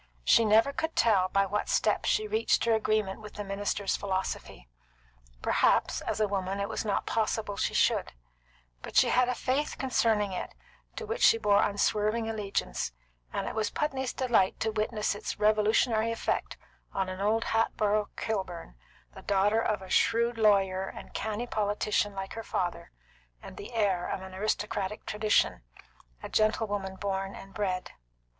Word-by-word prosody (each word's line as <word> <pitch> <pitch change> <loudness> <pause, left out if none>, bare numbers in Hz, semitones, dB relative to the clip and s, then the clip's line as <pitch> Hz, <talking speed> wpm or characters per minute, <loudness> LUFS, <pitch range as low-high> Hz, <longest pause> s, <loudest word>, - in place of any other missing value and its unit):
She 230 - +5
never 220 +6 +4
could 320 +2 -3
tell 195 -5 +3
by 195 +1 +2
what 205 +2 -2
steps - - +1
she 430 0 +1
reached 435 - +1
her 230 - +3
agreement 215 -2 0
with 210 -1 -11
the 205 - -4
minister's 200 0 -1
philosophy; 190 - -4 0.8
perhaps, - - +2
as - - -3
a 215 - +3
woman, 195 0 -2
it 200 - -1
was 220 - -3
not 205 -2 -1
possible 215 -2 -1
she - - -1
should; - - +2 0.7
but - - -9
she - - +6
had 250 0 +3
a 250 - 0
faith 270 +3 -1
concerning 225 -6 +1
it - - -5 0.4
to 455 - -5
which 455 +3 -4
she - - +6
bore 205 -2 +3
unswerving 210 +2 +1
allegiance, 200 - -2 0.4
and - - -3
it - - -3
was 215 -1 -1
Putney's 265 -2 -2
delight 235 -7 +1
to 220 - +1
witness 215 0 -1
its 205 - -5
revolutionary 215 +2 +3
effect 230 - -2 0.4
on 190 -1 0
an 185 +1 -5
old 220 +3 +2
Hatboro' 215 -2 +1
Kilburn, 185 - -4 0.4
the - - -11
daughter 205 +3 +2
of 210 -4 -1
a 185 - -11
shrewd 235 0 +2
lawyer 195 -3 +3
and - - -10
canny 220 +2 -3
politician 205 -2 0
like 195 0 -5
her 225 - -5
father, 180 -5 -3 0.5
and - - -11
the 200 - -9
heir 195 -5 +1
of 190 - -3
an 190 0 -9
aristocratic 210 0 -2
tradition, 210 - +1 0.6
a - - -4
gentlewoman 205 -3 0
born 195 0 -3
and 195 0 -11
bred. 185 -3 -2
210 Hz, 165 wpm, -29 LUFS, 195-225 Hz, 0.8 s, she